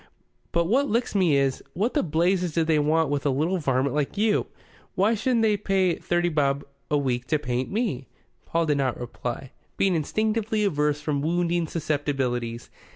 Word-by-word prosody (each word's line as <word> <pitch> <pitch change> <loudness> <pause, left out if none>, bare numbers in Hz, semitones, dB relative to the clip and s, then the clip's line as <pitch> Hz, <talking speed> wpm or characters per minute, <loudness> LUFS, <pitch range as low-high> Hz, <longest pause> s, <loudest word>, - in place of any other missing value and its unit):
But 170 0 +2
what 265 +10 +2
licks 235 +3 0
me 180 -7 +3
is: 135 -1 0
what 215 +7 0
the 295 - +2
blazes 175 +2 +1
do 165 - +2
they 160 -1 +2
want 155 +1 +2
with 145 -1 -1
a 145 - +2
little 160 +8 0
varmint 135 -2 +1
like 150 +3 -1
you? 215 0 +2 0.5
Why 205 +4 +3
shouldn't 230 +1 +1
they 215 -1 +4
pay 190 -3 +1
thirty 175 +1 0
bob 140 -3 0 0.2
a 150 - +2
week 125 -3 -1
to 155 - +2
paint 125 -3 -2
me?" 195 - -2 0.4
Paul 165 0 +1
did 150 -2 +1
not 130 -3 0
reply, 120 +1 -5 0.3
being 195 -1 +2
instinctively 215 +6 0
averse 150 -6 +1
from 150 -2 -1
wounding 170 +1 0
susceptibilities. 135 -7 -2
160 Hz, 175 wpm, -25 LUFS, 140-195 Hz, 0.5 s, they